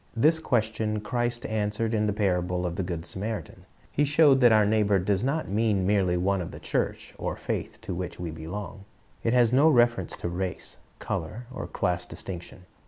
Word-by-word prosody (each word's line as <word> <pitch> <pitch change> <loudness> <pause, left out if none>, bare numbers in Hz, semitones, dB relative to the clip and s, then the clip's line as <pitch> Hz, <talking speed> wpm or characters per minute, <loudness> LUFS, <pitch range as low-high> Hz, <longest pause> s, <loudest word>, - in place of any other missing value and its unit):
This 155 +7 +4
question 110 -6 0
Christ 120 +2 -2
answered 110 +1 -1
in 105 -1 +2
the - - +2
p^irable 90 -3 0
of 85 -1 -2
the - - -1
good 85 -2 -4
Samaritan. 105 +4 -5 0.2
He 145 - +2
showed 145 -2 +5
that 120 -2 +7
our 110 -1 +5
neighbor 105 -1 +3
does 95 +2 0
not 150 +5 0
mean 105 -1 +1
merely 95 -3 +2
one 95 +2 +1
of 85 - -5
the - - -9
church - - -2
or - - -2
faith - - -4
to 110 -5 -5
which 90 0 -5
we 85 -2 -4
belong. 100 +5 -7 0.4
It 115 - +1
has 120 -1 +4
no 145 +5 +6
reference 120 - +2
to - - -4
race, 90 +1 -4 0.2
color, 110 +10 -4
or - - -5
class 90 0 -1
distinction. 90 0 -8
105 Hz, 185 wpm, -27 LUFS, 90-120 Hz, 0.4 s, that